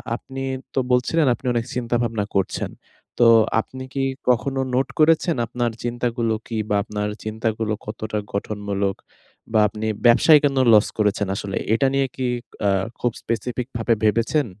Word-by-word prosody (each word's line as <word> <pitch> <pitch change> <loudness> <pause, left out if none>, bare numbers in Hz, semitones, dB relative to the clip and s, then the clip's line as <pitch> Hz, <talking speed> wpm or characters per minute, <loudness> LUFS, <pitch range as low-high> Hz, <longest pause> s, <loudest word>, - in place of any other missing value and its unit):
আপনি 135 +2 -7 0.3
তো - - +3
বলছিলেন, 125 +6 +2
"আপনি 130 - -18
অনেক 115 0 -1
চিন্তা 120 -1 -1
ভাবনা 110 -3 -1
করছেন।" 95 -2 0 0.5
তো 120 - +6 0.3
আপনি 130 +3 -9
কি 135 -1 -1 0.3
কখনো 135 +2 +1 0.2
নোট 130 +1 +2
করেছেন 165 +2 +4
আপনার 120 0 -2
চিন্তাগুলো 120 -1 -1
কি? 115 - -4
বা, 105 - +2
আপনার 105 -1 -3
চিন্তাগুলো 110 0 -2
কতটা 110 0 -4 0.2
গঠনমূলক? 100 -1 -2 0.6
বা, 110 - +5
আপনি 110 +2 -4 0.2
ব্যবসায় 150 +6 +7
কেন 140 -1 +1 0.2
লস 105 - +6
করেছেন 105 -1 +1
আসলে? 100 -1 -4
এ - - -13
এটা 135 +3 +2
নিয়ে 135 -1 +2
কি 130 -1 -1 0.4
আ - - +4 0.3
খুব 120 - +1
specific 120 +2 -3
ভাবে 115 0 +2
ভেবেছেন? 115 +8 +2
115 Hz, 155 wpm, -22 LUFS, 105-130 Hz, 0.6 s, ব্যবসায়